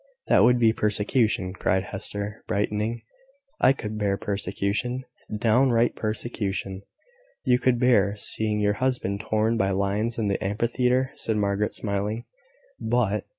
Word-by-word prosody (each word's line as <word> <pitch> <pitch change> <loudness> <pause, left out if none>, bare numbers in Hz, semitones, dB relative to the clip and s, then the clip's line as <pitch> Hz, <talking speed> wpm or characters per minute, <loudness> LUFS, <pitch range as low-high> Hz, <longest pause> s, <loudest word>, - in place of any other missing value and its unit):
"That - - +6
would 125 0 +5
be 115 -2 +4
persecution," 105 -2 +1
cried 95 0 0
Hester, 100 +1 -6
brightening. 105 +3 -1 0.6
"I - - +6
could 110 -5 -4
bear 100 -2 0
persecution, 100 +5 -2 0.3
downright 120 +1 +3
persecution." 100 -3 -3 0.6
"You 125 -2 +3
could 125 -1 +2
bear 105 -5 +3
seeing 105 0 +2
your 105 0 +2
husband 125 -6 0
torn 110 +1 0
by 95 -3 +1
lions 100 +4 -1
in 110 -3 0
the 100 - -1
amphitheatre," 125 +5 0
said 110 -1 -2
Margaret, 100 0 0
smiling, 105 +2 -2 0.5
"but..." - - 0
105 Hz, 130 wpm, -25 LUFS, 100-120 Hz, 0.6 s, That